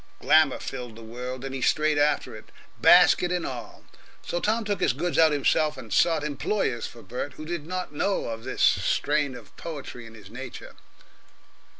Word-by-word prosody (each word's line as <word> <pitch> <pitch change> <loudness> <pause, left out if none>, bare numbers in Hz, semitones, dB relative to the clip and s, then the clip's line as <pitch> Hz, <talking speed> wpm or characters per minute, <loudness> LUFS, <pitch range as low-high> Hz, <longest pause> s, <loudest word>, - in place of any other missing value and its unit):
Glamour - - +4
filled 120 -3 -7
the 115 - -11
world, 125 +3 -6
and 135 - -5
he 135 - -4
strayed 155 +2 +2
after 145 +1 +1
it, - - -11 0.4
basket 180 0 +6
and 180 -1 -1
all. 120 -5 -7 0.4
So 175 - -2
Tom 220 +4 0
took 205 -1 -2
his - - +3
goods 170 +6 -1
out 160 -1 +6
himself, 150 +1 +1
and 115 -4 -7
sought 165 -3 +3
employers 145 - -1
for 120 - -13
Bert 125 +4 -5
who 155 - -9
did 165 -2 -5
not 185 -3 -4
know 195 +7 0
of 115 0 -5
this 130 - -2
strain 145 -3 +2
of 115 -4 -13
poetry 140 -7 -7
in 115 - -14
his 105 -2 -14
nature. 125 +1 -9
145 Hz, 185 wpm, -26 LUFS, 125-165 Hz, 0.4 s, basket